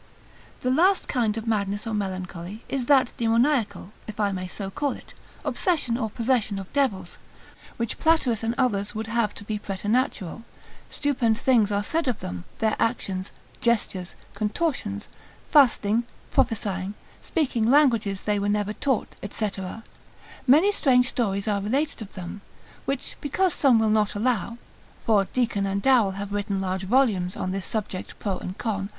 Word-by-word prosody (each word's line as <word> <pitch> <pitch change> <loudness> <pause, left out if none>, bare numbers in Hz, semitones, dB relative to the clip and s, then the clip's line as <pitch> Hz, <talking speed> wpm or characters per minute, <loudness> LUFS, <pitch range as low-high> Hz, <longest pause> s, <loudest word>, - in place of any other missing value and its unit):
The 255 - +1
last 365 +8 +4
kind 230 -4 0
of 225 - -4
madness 205 -2 -1
or 225 - -3
melancholy, 185 0 -4
is 260 -3 -2
that 270 -4 +4
demoniacal 230 -4 +1 0.2
(if 215 0 -8
I 205 -1 +2
may 185 -1 -4
so 195 +1 -6
call 285 +6 -1
it) - - -12 0.3
obsession 310 -10 +1
or 225 -3 -1
possession 230 -3 0
of 195 -1 -8
devils, 205 -11 0 0.6
which 235 -1 -2
Platerus 315 -9 +3
and 230 +1 -1
others 210 -7 0
would 220 +1 -3
have 225 -2 0
to - - -8
be 210 0 -3
preternatural: 205 0 -1 0.5
stupend 245 -6 +1
things 230 -4 +3
are 200 0 +1
said 320 +7 -1
of 245 -4 0
them, 90 -1 -6
their 220 -1 +1
actions, 195 -5 -1 0.3
gestures, 205 -6 0 0.2
contortions, 210 - -2 0.4
fasting, 235 -5 +4 0.3
prophesying, 200 -3 0 0.3
speaking 245 -8 0
languages 235 -9 +3
they 210 -1 +1
were 200 +1 0
never 205 0 0
taught, 265 0 -1
&c. 215 +1 -1 1.0
Many 315 +11 +6
strange 255 -9 +3
stories 200 -5 -1
are 205 -2 +1
related 270 +7 -1
of 210 - -8
them, 185 +2 -7 0.4
which 275 -1 -2
because 360 +6 +1
some 265 -5 +4
will 220 -1 +3
not 215 -1 +2
allow, 230 0 0 0.5
(for 210 -4 +4
Deacon 215 -4 0
and 195 0 0
Darrel 225 -4 +4
have 200 0 -5
written 205 -1 -1
large 190 0 -2
volumes 200 -6 +2
on 185 - -2
this 195 0 -2
subject 205 -4 -4
pro 195 -3 -2
and 185 - -6
con.) 200 -4 -2
220 Hz, 155 wpm, -25 LUFS, 200-250 Hz, 1.0 s, Many